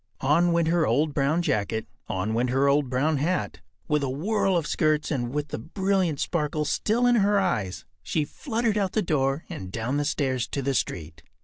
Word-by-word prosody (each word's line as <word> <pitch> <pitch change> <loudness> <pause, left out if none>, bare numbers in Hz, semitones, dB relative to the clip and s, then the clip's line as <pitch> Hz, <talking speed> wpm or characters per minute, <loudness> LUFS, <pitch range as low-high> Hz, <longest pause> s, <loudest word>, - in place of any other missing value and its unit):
On 165 +6 +3
went 170 -1 +2
her 170 -1 +2
old 145 +6 +1
brown 150 +5 +1
jacket; 110 -3 -1 0.2
on 95 +4 -2
went 120 +2 +1
her 135 +3 +2
old 140 -1 +2
brown 140 +4 +1
hat. 170 +6 -1 0.3
With 150 -2 +1
a 140 - -1
whirl 195 +6 +1
of 165 - -1
skirts 155 0 +1
and 120 -5 -1
with 150 +1 -3
the - - -4
brilliant 185 - 0
sparkle 150 -2 -1
still 230 +10 +1
in 245 -1 +4
her 205 -1 +3
eyes, 105 - -1 0.2
she 150 - -1
fluttered 225 - -1
out 195 -2 -1
the 215 - +1
door 140 -2 0
and 95 -1 -7
down 120 +6 -2
the 145 - 0
stairs 130 -5 0
to 140 - -3
the 135 +1 0
street. 80 -9 -3
150 Hz, 200 wpm, -26 LUFS, 130-175 Hz, 0.3 s, in